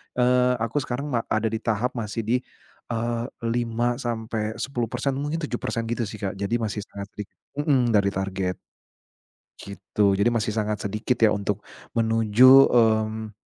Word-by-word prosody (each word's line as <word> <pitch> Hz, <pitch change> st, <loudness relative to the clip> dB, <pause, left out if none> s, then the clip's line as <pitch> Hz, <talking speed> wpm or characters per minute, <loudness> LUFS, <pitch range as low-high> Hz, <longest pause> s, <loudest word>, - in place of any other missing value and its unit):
eee, 125 Hz, 0 st, +3 dB
aku 115 Hz, +6 st, 0 dB
sekarang 140 Hz, +2 st, -4 dB
ma 120 Hz, -, +2 dB
ada 110 Hz, 0 st, 0 dB
di 110 Hz, -, -2 dB
tahap 115 Hz, +2 st, -1 dB
masih 115 Hz, -1 st, -4 dB
di, 115 Hz, +4 st, +1 dB, 0.5 s
eee, 115 Hz, 0 st, -2 dB, 0.2 s
5-10% 120 Hz, +1 st, -2 dB
mungkin 150 Hz, +3 st, -3 dB
7% 120 Hz, -3 st, -2 dB
gitu 120 Hz, -2 st, -1 dB
sih 105 Hz, 0 st, -9 dB
Kak, 95 Hz, 0 st, -3 dB
jadi 100 Hz, +4 st, -1 dB
masih 110 Hz, -3 st, -2 dB
sangat 100 Hz, 0 st, -8 dB
dik 105 Hz, -, -4 dB, 0.3 s
mhm, 130 Hz, -6 st, +2 dB
dari 100 Hz, -2 st, +3 dB
target. 95 Hz, -1 st, -2 dB, 1.0 s
Gitu 100 Hz, +1 st, 0 dB
jadi 100 Hz, +4 st, +2 dB
masih 110 Hz, -2 st, 0 dB
sangat 105 Hz, -1 st, -2 dB
sedikit 105 Hz, +5 st, -1 dB
ya 105 Hz, -, +5 dB
untuk 100 Hz, 0 st, -2 dB, 0.3 s
menuju, 115 Hz, 0 st, +3 dB, 0.2 s
mmm, 110 Hz, -2 st, +2 dB
115 Hz, 145 wpm, -24 LUFS, 105-120 Hz, 1.0 s, ya